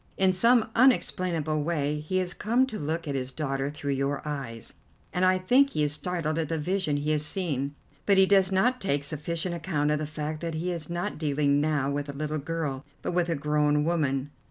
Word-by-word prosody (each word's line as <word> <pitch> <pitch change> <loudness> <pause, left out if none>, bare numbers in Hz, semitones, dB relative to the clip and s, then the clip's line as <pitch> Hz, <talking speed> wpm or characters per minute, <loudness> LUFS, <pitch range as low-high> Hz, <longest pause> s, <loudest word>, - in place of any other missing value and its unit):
In 190 -1 +4
some 230 +3 +4
unexplainable 175 - +2
way 150 -2 -1
he 155 +5 -2
has 180 -1 0
come 235 +6 +2
to 235 -5 -6
look 160 +2 -3
at 140 - -1
his 130 -1 -3
daughter 135 -2 -2
through 145 -1 -4
your 140 +2 -1
eyes, 130 -6 -4 0.4
and 180 - 0
I 185 0 +5
think 250 +10 +4
he 150 - 0
is 145 0 +1
startled 165 -1 -2
at 160 -3 -2
the 165 - 0
vision 165 -1 0
he 150 +1 -1
has 150 -1 +2
seen. 145 -4 -1 0.3
But 200 -1 +5
he 190 - +7
does 195 -1 +4
not 245 +7 +2
take 145 -6 0
sufficient 160 +4 -3
account 155 -3 0
of 150 - +1
the 155 - -3
fact 155 0 -4
that 165 -1 -4
he 175 +3 -2
is 165 -3 -4
not 175 -2 -3
dealing 145 -2 +2
now 145 -3 +1
with 145 0 -3
a - - -4
little 155 +1 -2
girl, 145 -3 -3 0.2
but - - -1
with 175 -1 +1
a 165 - +1
grown 150 0 +2
woman. 145 -4 0
155 Hz, 215 wpm, -27 LUFS, 145-180 Hz, 0.4 s, he